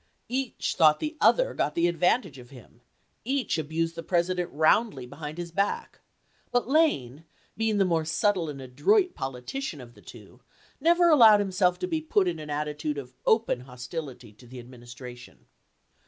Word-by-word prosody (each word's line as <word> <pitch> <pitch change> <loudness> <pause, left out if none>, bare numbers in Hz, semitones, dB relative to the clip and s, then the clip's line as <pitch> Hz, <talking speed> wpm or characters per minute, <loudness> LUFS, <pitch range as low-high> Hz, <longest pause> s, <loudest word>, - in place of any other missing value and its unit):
Each 260 0 -2
thought 155 -3 +5
the 310 +1 -4
other - - +4
got 150 - -1
the 170 0 +2
advantage 175 - 0
of 120 -1 -14
him, 125 -2 -16 0.4
each 260 -8 -1
abused 165 +2 -2
the 165 - -7
President 180 +1 -1
roundly 155 - +2
behind 150 +4 -8
his 175 -1 -6
back; 200 +4 -2 0.5
but 245 -1 +1
Lane, 165 - +1 0.3
being 220 -1 0
the 195 - +3
more 165 -3 +1
subtle 165 +2 0
and 140 -2 -7
adroit 360 - +1
politician 135 - -5
of 120 -2 -12
the - - -18
two, - - -14 0.4
never 340 +3 +4
allowed 225 -9 +7
himself 185 -2 +1
to 365 - -3
be 320 -3 -2
put 205 -12 +1
in 170 -2 -2
an 150 -1 -8
attitude 150 0 -3
of 130 -3 -8
open 220 - +2
hostility 125 -1 -8
to 120 +4 -18
the 130 +2 -11
Adminis 120 -1 -12
tration. 125 -1 -12
165 Hz, 170 wpm, -27 LUFS, 135-220 Hz, 0.5 s, allowed